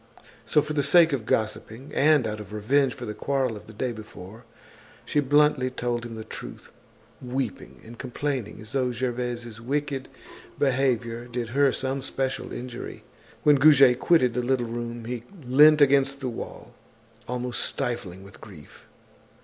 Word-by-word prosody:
So, 150 - +3
for 150 0 -4
the 145 - +1
sake 165 +1 +5
of 120 -6 -3
gossiping, 110 +4 -2
and 150 -3 +4
out 105 -1 -3
of 105 0 -10
revenge 130 +6 +1
for 120 - -7
the 105 - -4
quarrel 135 -1 -1
of 105 - -11
the - - -10
day 125 +3 -2
before, 110 0 -11 0.6
she 150 - +1
bluntly 145 -2 +3
told 120 -2 -3
him 115 - -8
the 110 - -6
truth, - - -9 0.5
weeping 125 - -4
and 115 +1 -12
complaining 130 -2 -4
as 110 0 -9
though 130 -2 0
Gervaise's 120 -2 -4
wicked 140 +1 -2 0.5
behavior 125 -4 0
did 120 -1 -4
her 140 +2 +3
some 135 +1 -2
special 135 0 -3
injury. 125 -1 -7 0.4
When 150 -1 +6
Goujet 135 -3 +6
quitted 130 -8 +3
the 125 - 0
little 125 0 0
room, 120 0 -5
he 120 0 -4 0.2
leant 150 +4 +6
against 140 0 +4
the 130 -2 -3
wall, 115 - -8 0.5
almost 125 0 -2
stifling 120 -8 -3
with 100 +1 -15
grief. 80 -8 -14
125 Hz, 155 wpm, -26 LUFS, 115-140 Hz, 0.6 s, When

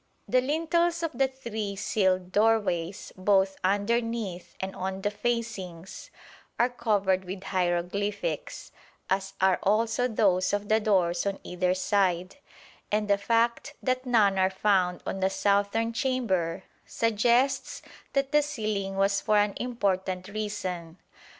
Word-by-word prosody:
The 255 - +3
lintels 335 +4 +1
of 330 - -1
the 265 +2 +2
three 220 -6 -5
sealed 185 -3 0
doorways, 205 -4 +1
both 190 0 +2
underneath 205 -2 -1
and 190 0 -4
on 190 +1 -4
the 205 - +1
facings, 205 -6 -4 0.5
are 240 - +3
covered 200 -6 +1
with 190 +1 -7
hieroglyphics, 185 - -2 0.4
as 195 0 0
are 190 -1 +3
also 225 +4 +2
those 195 -6 +2
of 205 0 -2
the 220 +1 +4
doors 185 -4 +1
on 195 -1 -1
either 180 0 0
side, 185 +1 0 0.5
and 210 0 +1
the 200 -1 +3
fact 235 +7 0
that 255 0 -1
none 205 -5 +3
are 190 0 +4
found 190 -2 +1
on 195 - -3
the 190 0 +2
southern 205 +4 +1
chamber 230 - -1 0.2
suggests 240 +4 +1 0.3
that 275 0 0
the 300 0 +5
sealing 215 -9 -3
was 195 0 +2
for 215 - +2
an 205 -1 +2
important 190 -6 -1
reason. 190 -5 -4
205 Hz, 130 wpm, -27 LUFS, 190-230 Hz, 0.5 s, the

